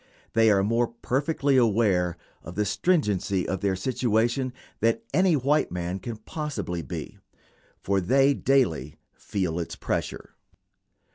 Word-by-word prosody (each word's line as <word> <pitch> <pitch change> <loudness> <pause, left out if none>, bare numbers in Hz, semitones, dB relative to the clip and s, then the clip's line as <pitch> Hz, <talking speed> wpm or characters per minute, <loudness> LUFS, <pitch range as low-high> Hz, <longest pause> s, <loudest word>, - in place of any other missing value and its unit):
They 115 0 +5
are 100 -2 +4
more 115 +3 +2
perfectly 135 +4 0
aware 100 -7 +2 0.2
of 85 - -10
the 105 +1 +1
stringency 100 - +1
of 95 - -2
their 100 -2 +1
situation 120 +4 0 0.3
than 115 +1 +2
any 185 -3 +4
white 145 +2 +1
man 90 +1 -3
can 115 +3 -6
possibly 110 - -4
be, 70 - -7 0.6
for 100 0 +1
they 135 +9 +4
daily 80 - +1 0.2
feel 90 -5 -3
its 85 - -4
pressure. - - -4
110 Hz, 130 wpm, -26 LUFS, 95-130 Hz, 0.6 s, They